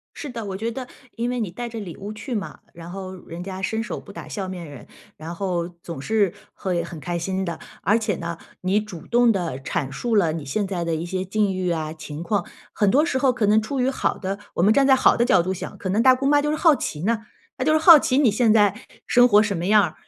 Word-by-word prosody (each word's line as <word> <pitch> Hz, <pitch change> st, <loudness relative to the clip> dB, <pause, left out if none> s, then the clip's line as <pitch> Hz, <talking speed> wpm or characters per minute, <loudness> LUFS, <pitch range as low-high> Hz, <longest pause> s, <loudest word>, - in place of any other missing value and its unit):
是 295 Hz, -, -6 dB
的， 235 Hz, -4 st, -6 dB
我 195 Hz, -2 st, -4 dB
觉 225 Hz, +4 st, -2 dB
得 255 Hz, +2 st, -6 dB, 0.3 s
因 235 Hz, +1 st, -1 dB
为 250 Hz, -1 st, -2 dB
你 210 Hz, -5 st, -2 dB
带 240 Hz, +7 st, -5 dB
着 230 Hz, -1 st, -7 dB
礼 185 Hz, -6 st, -7 dB
物 205 Hz, +2 st, -7 dB
去 240 Hz, +4 st, -6 dB
嘛， 205 Hz, -4 st, -4 dB, 0.2 s
然 170 Hz, 0 st, -10 dB
后 190 Hz, 0 st, -7 dB
人 170 Hz, +1 st, -7 dB
家 190 Hz, 0 st, -6 dB
伸 220 Hz, +3 st, -1 dB
手 -, -, -5 dB
不 -, -, -13 dB
打 -, -, -9 dB
笑 195 Hz, -3 st, -4 dB
面 180 Hz, -2 st, -6 dB
人， 140 Hz, -4 st, -11 dB, 0.3 s
然 160 Hz, +3 st, -7 dB
后 175 Hz, -2 st, -2 dB
总 165 Hz, -5 st, -7 dB
是 205 Hz, 0 st, +1 dB, 0.2 s
会 180 Hz, -3 st, -2 dB
很 170 Hz, -1 st, -8 dB
开 170 Hz, +4 st, -3 dB
心 190 Hz, +3 st, -2 dB
的。 170 Hz, -3 st, -4 dB, 0.2 s
而 210 Hz, +6 st, +3 dB
且 215 Hz, -4 st, -1 dB
呢， 170 Hz, 0 st, -5 dB, 0.2 s
你 190 Hz, +3 st, +2 dB
主 200 Hz, -6 st, -9 dB
动 240 Hz, 0 st, +4 dB
地 175 Hz, -, -1 dB
阐 135 Hz, +1 st, -3 dB
述 225 Hz, -, -1 dB
了 170 Hz, -6 st, +3 dB
你 160 Hz, -2 st, -5 dB
现 195 Hz, +9 st, -1 dB
在 185 Hz, -3 st, -3 dB
的 165 Hz, -1 st, -1 dB
一 160 Hz, +2 st, -3 dB
些 185 Hz, +1 st, -3 dB
境 200 Hz, +1 st, 0 dB
遇 185 Hz, -1 st, -1 dB
啊 155 Hz, -2 st, -2 dB
情 155 Hz, -1 st, -8 dB
况， 200 Hz, 0 st, 0 dB, 0.3 s
很 205 Hz, -2 st, +2 dB
多 290 Hz, +8 st, +4 dB
时 295 Hz, -5 st, 0 dB
候 260 Hz, -1 st, +3 dB
可 235 Hz, -4 st, 0 dB
能 215 Hz, +2 st, +4 dB
处 260 Hz, +5 st, -3 dB
于 250 Hz, -, +2 dB
好 270 Hz, -, -1 dB
的 195 Hz, 0 st, -3 dB, 0.2 s
我 -, -, 0 dB
们 205 Hz, +4 st, +5 dB
站 275 Hz, -1 st, +4 dB
在 270 Hz, -, +7 dB
好 -, -, +4 dB
的 240 Hz, -, +3 dB
角 205 Hz, -, +4 dB
度 185 Hz, +2 st, -2 dB
想， -, -, -7 dB
可 190 Hz, -, -4 dB
能 205 Hz, +5 st, +2 dB
大 260 Hz, 0 st, +7 dB
姑 265 Hz, +2 st, -2 dB
妈 290 Hz, +1 st, +4 dB
就 295 Hz, -, 0 dB
是 305 Hz, -, 0 dB
好 320 Hz, -1 st, +5 dB
奇 155 Hz, -, -4 dB
呢， 225 Hz, +3 st, +1 dB, 0.4 s
那 255 Hz, -, -1 dB
就 310 Hz, -, +3 dB
是 315 Hz, -, +4 dB
好 320 Hz, 0 st, +9 dB
奇 260 Hz, -1 st, +1 dB
你 275 Hz, -6 st, +5 dB
现 220 Hz, +1 st, +3 dB
在 205 Hz, -3 st, +4 dB, 0.3 s
生 245 Hz, 0 st, +5 dB
活 210 Hz, -2 st, +6 dB
什 205 Hz, -2 st, -1 dB
么 170 Hz, +1 st, -3 dB
样 210 Hz, +1 st, +6 dB
儿。 -, -, -2 dB
200 Hz, 295 characters per minute, -23 LUFS, 175-235 Hz, 0.4 s, 好